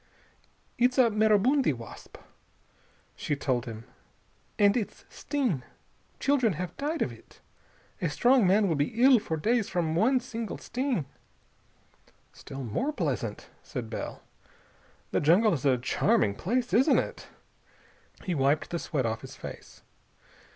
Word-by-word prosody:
"It's 250 +2 +3
a 245 -3 +5
maribundi 215 - +3
wasp," 115 -2 -11 1.0
she 145 - -2
told 130 -4 -1
him 115 -1 -7 0.7
"And 205 -1 +4
its 225 -5 -4
sting.... 255 - -2 0.6
Children 260 -7 +2
have 180 +3 -5
died 300 +4 -1
of - - -3
it. - - -16 0.6
A - - 0
strong 245 -4 +4
man 200 +2 +4
will 170 - +1
be 150 +9 -2
ill 260 -2 +7
for 160 -5 -3
days 225 +6 +1
from 170 -3 -1
one 245 +9 +3
single 230 -3 -5
sting." 250 - -2 1.3
"Still 135 0 -8
more 125 - -1
pleasant," - - -3
said - - -6
Bell. - - -6 0.9
"The - - +1
jungle 180 +8 +4
is 145 -3 -3
a 130 -2 +4
charming 125 - +1
place, 240 - -2
isn't 260 +8 +5
it?" - - -3 1.0
He 180 - -2
wiped 145 +1 +1
the 170 - -2
sweat 140 -6 -2
off 115 0 -2
his - - -10
face. - - -10
205 Hz, 135 wpm, -28 LUFS, 150-245 Hz, 1.3 s, ill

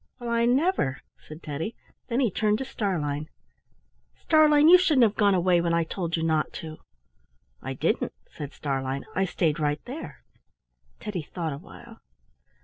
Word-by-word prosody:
"Well, 240 -2 -5
I 235 0 +2
never!" 250 - +1 0.3
said 155 +2 -11
Teddy. 155 +9 -4 0.3
Then 240 +3 0
he 240 -6 +2
turned 210 +3 +1
to 265 - -4
Starlein. 155 - -2 0.9
"Starlein, 305 -1 +5
you 360 +2 +9
shouldn't 310 -8 +4
have 215 -3 +4
gone 205 -2 +3
away 175 -1 +3
when 170 0 +1
I 170 - +2
told 170 0 -3
you 165 - -2
not 160 -1 +1
to." 155 -1 -8 0.8
"I - - -5
didn't," - - 0 0.2
said 145 -1 -8
Starlein. 135 -1 -3
"I 195 - +1
stayed 165 -3 0
right 150 0 0
there." 250 - -8 0.8
Teddy 205 -5 -4
thought 160 0 -4
awhile. 220 +9 -12
180 Hz, 155 wpm, -26 LUFS, 155-235 Hz, 0.9 s, you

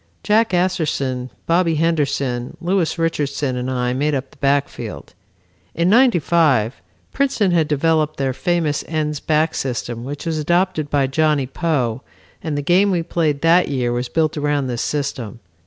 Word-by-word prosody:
Jack 220 +2 +3
Asserson, 150 -8 -1 0.2
Bobby 170 -1 +2
Henderson, 140 -6 -1
Louis 180 -1 0
Richardson 145 -5 -1
and 125 +1 -3
I 125 -1 -1
made 145 +3 0
up 135 0 -4
the - - -21
backfield. 140 0 -2 0.6
In 170 +3 +2
'95, 170 - +3 0.3
Princeton 260 -8 +1
had 165 -3 +2
developed 155 +1 +1
their 135 -1 -1
famous 165 -1 0
ends 150 -2 -2
back 155 +2 +1
system 120 -2 -3
which 145 +5 -6
was 160 -2 -1
adopted 170 -1 0
by 140 -2 +2
Johnny 150 0 +1
Poe 130 -4 -1 0.4
and 155 -3 -3
the 145 - -2
game 185 +6 +3
we 175 -3 0
played 155 -4 -1
that 170 +2 +4
year 125 -3 -1
was 120 0 -2
built 155 +2 0
around 145 -1 0
this 120 -2 -3
system. 135 -7 -3
150 Hz, 155 wpm, -20 LUFS, 135-170 Hz, 0.6 s, that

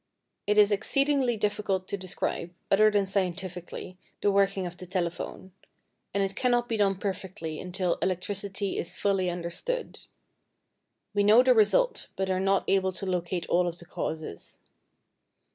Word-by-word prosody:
It 210 0 +2
is 210 0 +6
exceedingly 265 +4 +2
difficult 205 -3 -1
to - - -1
describe, 180 -2 -3 0.2
other 215 +2 +6
than 205 -2 +2
scientifically, 185 -1 -3 0.2
the 205 - +3
working 195 -1 +2
of 175 0 -6
the 180 - -9
telephone; 180 +1 -3 0.6
and 200 0 +1
it 195 0 -2
cannot 245 -1 +2
be 230 - -1
done 200 -2 +2
perfectly 185 -4 -4
until 180 -1 -1
electricity 195 +2 -1
is 170 - -3
fully 195 -2 +1
understood. 175 - -3 1.1
We 205 0 +2
know 215 +4 +7
the 255 0 +6
result, 365 - +3
but 190 0 -1
are 185 - +1
not 195 0 +2
able 190 -1 +2
to 185 - -4
locate 180 -1 -2
all 175 +1 +2
of 170 0 -4
the 170 - -12
causes. 160 - -6
195 Hz, 150 wpm, -28 LUFS, 180-205 Hz, 1.1 s, know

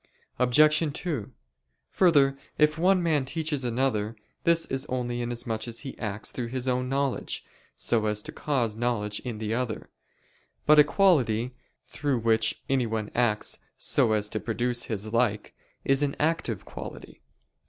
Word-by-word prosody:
Obj. 150 +5 +5 0.2
2: 140 - -3 0.6
Further, 145 -7 +4 0.2
if 155 +1 +3
one 185 +1 +4
man 155 -5 +2
teaches 150 0 -2
another 120 -3 0 0.3
this 170 0 +4
is 135 +2 -3
only 120 -1 -2
inasmuch 120 -1 -3
as 115 -1 -5
he 135 - -7
acts 105 -1 -3
through 120 -2 -4
his 130 +1 -3
own 125 0 0
knowledge, 135 -1 -1 0.3
so 110 -2 +1
as 105 0 -1
to - - -6
cause 125 -7 -1
knowledge 110 -3 -1
in 120 -4 -5
the 110 0 -2
other. 120 -2 -3 0.7
But 150 0 +7
a - - +10
quality 125 - +2 0.3
through 140 -2 -1
which 110 -1 +1
anyone 110 -5 0
acts 115 -3 0 0.2
so 110 - +2
as 105 -1 +1
to 110 - -2
produce 120 +3 -1
his 110 0 -4
like, 110 -3 +1 0.3
is 135 +1 +3
an 140 -1 0
active 150 - -1
quality. - - -9
125 Hz, 150 wpm, -27 LUFS, 110-140 Hz, 0.7 s, a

